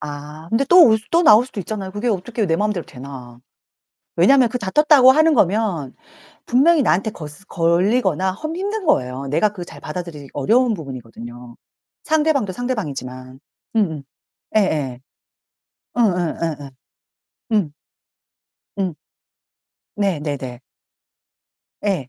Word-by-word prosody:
아 150 Hz, +2 st, -8 dB
근데 225 Hz, +6 st, +1 dB
또 355 Hz, -2 st, +8 dB
올 220 Hz, -, +5 dB
또 340 Hz, +1 st, +3 dB
나올 215 Hz, 0 st, +7 dB
수도 255 Hz, -4 st, -10 dB
있잖아요. 195 Hz, 0 st, -5 dB
그게 205 Hz, +5 st, -5 dB
어떻게요 215 Hz, +2 st, -1 dB
내 165 Hz, -, +1 dB
마음대로 210 Hz, -4 st, -1 dB
되나. 125 Hz, -3 st, -10 dB, 0.8 s
왜냐면 250 Hz, +8 st, +5 dB
그 250 Hz, -, -3 dB
다쳤다고 260 Hz, +5 st, +5 dB
하는 315 Hz, +3 st, +4 dB
거면 190 Hz, -, 0 dB, 0.5 s
분명히 290 Hz, +5 st, +4 dB
나한테 205 Hz, -2 st, +1 dB
거스 155 Hz, +3 st, -11 dB
걸리거나 190 Hz, +1 st, +1 dB
험 310 Hz, -, -6 dB
힘든 405 Hz, +2 st, -3 dB
거예요. 130 Hz, -, 0 dB
내가 155 Hz, +10 st, +2 dB
그걸 190 Hz, -4 st, -8 dB
잘 -, -, -13 dB
받아들이기 155 Hz, -3 st, -7 dB
어려운 230 Hz, -, +2 dB
부분이거든요. 120 Hz, -, -9 dB, 0.5 s
상대방도 305 Hz, -, +1 dB
상대방이지만. 135 Hz, -, -5 dB, 0.4 s
음음 160 Hz, -10 st, 0 dB, 0.5 s
예예. 150 Hz, -, 0 dB, 1.0 s
응응 180 Hz, -8 st, +1 dB
예예 150 Hz, -4 st, -4 dB, 0.8 s
응. 200 Hz, -9 st, +1 dB, 1.1 s
응. 185 Hz, -5 st, -1 dB, 1.0 s
네 195 Hz, -7 st, 0 dB
네네. 135 Hz, -5 st, -5 dB, 1.2 s
예. 185 Hz, -11 st, -1 dB
190 Hz, 270 characters per minute, -20 LUFS, 145-235 Hz, 1.2 s, 또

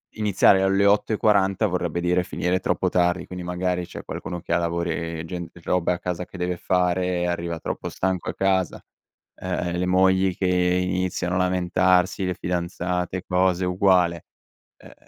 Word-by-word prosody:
iniziare 100 Hz, -2 st, +4 dB
alle 95 Hz, +1 st, +3 dB
8:40 100 Hz, -1 st, +2 dB
vorrebbe 90 Hz, -3 st, -1 dB
dire 90 Hz, +1 st, +1 dB
finire 90 Hz, +1 st, -1 dB
troppo -, -, 0 dB
tardi. 90 Hz, 0 st, +1 dB
Quindi 90 Hz, -1 st, -7 dB
magari 90 Hz, 0 st, -2 dB
c'è -, -, -9 dB
qualcuno 90 Hz, -1 st, -6 dB
che 85 Hz, -, -3 dB
ha -, -, +4 dB
lavori 85 Hz, -1 st, -2 dB
gen 85 Hz, 0 st, -6 dB
e -, -, -15 dB
robe 90 Hz, 0 st, +1 dB
a 90 Hz, -, -5 dB
casa 90 Hz, 0 st, -4 dB
che 95 Hz, -, -12 dB
deve 90 Hz, 0 st, -2 dB
fare, 90 Hz, 0 st, 0 dB
arriva 85 Hz, -1 st, -2 dB
troppo -, -, -4 dB
stanco 95 Hz, -2 st, -2 dB
a -, -, -5 dB
casa. 95 Hz, -1 st, 0 dB, 0.6 s
Eh, 90 Hz, -1 st, -3 dB
eh, 85 Hz, -, -3 dB
le 90 Hz, -, 0 dB
mogli 95 Hz, 0 st, +3 dB
che 95 Hz, -, -1 dB
iniziano 90 Hz, 0 st, 0 dB
a -, -, +1 dB
lamentarsi, 90 Hz, +1 st, +2 dB
le 90 Hz, -1 st, -2 dB
fidanzate 90 Hz, +1 st, -2 dB
e 90 Hz, -, -7 dB
cose, 90 Hz, 0 st, +2 dB
uguale. 90 Hz, -2 st, +2 dB, 0.5 s
Eh, -, -, -15 dB
90 Hz, 165 wpm, -24 LUFS, 90-95 Hz, 0.6 s, iniziare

